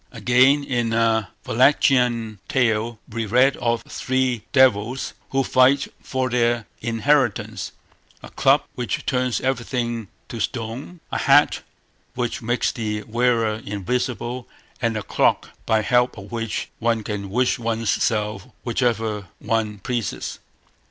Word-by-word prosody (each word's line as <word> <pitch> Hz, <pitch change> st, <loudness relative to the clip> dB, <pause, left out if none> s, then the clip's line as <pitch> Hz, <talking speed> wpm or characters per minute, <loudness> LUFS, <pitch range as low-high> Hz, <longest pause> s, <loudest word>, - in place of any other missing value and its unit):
Again, 130 Hz, +4 st, +4 dB
in 120 Hz, -4 st, -1 dB
a 110 Hz, -2 st, +2 dB, 0.2 s
Wallachian 120 Hz, -4 st, +3 dB
tale, 115 Hz, -2 st, +1 dB
we 115 Hz, 0 st, -4 dB
read 125 Hz, +6 st, +4 dB
of 120 Hz, -1 st, 0 dB
three 130 Hz, -3 st, -1 dB
devils 125 Hz, -1 st, +3 dB, 0.2 s
who 135 Hz, 0 st, +1 dB
fight 130 Hz, +2 st, +3 dB
for 130 Hz, -1 st, -1 dB
their 120 Hz, -2 st, +1 dB, 0.2 s
inheritance—a 115 Hz, -4 st, -2 dB
club -, -, +3 dB
which 125 Hz, -1 st, -3 dB
turns 125 Hz, -2 st, 0 dB
everything 120 Hz, -3 st, -2 dB, 0.2 s
to 115 Hz, -, -6 dB
stone, 120 Hz, -, -4 dB
a -, -, -1 dB
hat 145 Hz, +1 st, +4 dB, 0.5 s
which 125 Hz, -2 st, -2 dB
makes 120 Hz, +2 st, 0 dB
the 105 Hz, -2 st, -3 dB
wearer 115 Hz, -1 st, +1 dB
invisible, 120 Hz, +4 st, -3 dB, 0.3 s
and 115 Hz, -2 st, 0 dB
a 105 Hz, -, -4 dB
cloak -, -, +1 dB, 0.2 s
by 110 Hz, -1 st, +3 dB
help 125 Hz, +3 st, +2 dB
of 100 Hz, +3 st, -10 dB
which 115 Hz, -2 st, -3 dB
one 115 Hz, -1 st, +1 dB
can 100 Hz, -2 st, -4 dB
wish 125 Hz, +4 st, +1 dB
one's 115 Hz, -2 st, 0 dB
self 105 Hz, -3 st, -1 dB, 0.2 s
whithersoever 115 Hz, -4 st, -1 dB
one 110 Hz, -2 st, -1 dB
pleases. 120 Hz, +3 st, -3 dB
115 Hz, 125 wpm, -22 LUFS, 110-125 Hz, 0.5 s, Again